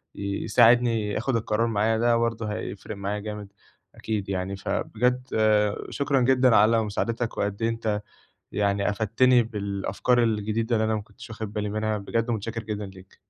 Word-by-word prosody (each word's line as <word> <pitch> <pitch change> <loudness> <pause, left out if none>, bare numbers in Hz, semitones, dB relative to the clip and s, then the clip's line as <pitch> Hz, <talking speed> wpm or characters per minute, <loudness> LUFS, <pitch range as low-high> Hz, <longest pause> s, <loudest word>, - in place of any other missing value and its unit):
ي 100 0 -3
يساعدني 115 -1 +4
ياخد 120 +5 -1
القرار 115 0 0
معايا 110 0 +1
ده 120 +1 +3
برضه 115 -2 -1
هيفرق 105 0 -6
معايا 100 +1 -3
جامد 105 -1 -7 0.4
أكيد 105 -3 -3
يعني 95 0 -2
فبجد 125 +5 -1
آآ، 105 -1 +3
شكرًا 140 -1 0
جدًا 125 -1 +4
على 110 +2 +5
مساعدتك، 115 +3 -2
وقد 100 +2 -2
إيه 115 - +2
أنت 110 -2 -2 0.5
يعني 100 0 +1
أفدتني 115 +4 +3
بالأفكار 105 +3 -1
الجديدة 110 +1 0
اللي 110 - +1
أنا 110 0 +1
ما 105 - -2
كنتش 125 +3 -14
واخد 110 -2 -6
بالي 105 -1 -2
منها، 110 0 -1
بجد 115 +4 -2
متشكّر 115 0 -3
جدًا 105 -1 -4
ليك. 95 +1 -16
110 Hz, 165 wpm, -25 LUFS, 105-115 Hz, 0.5 s, على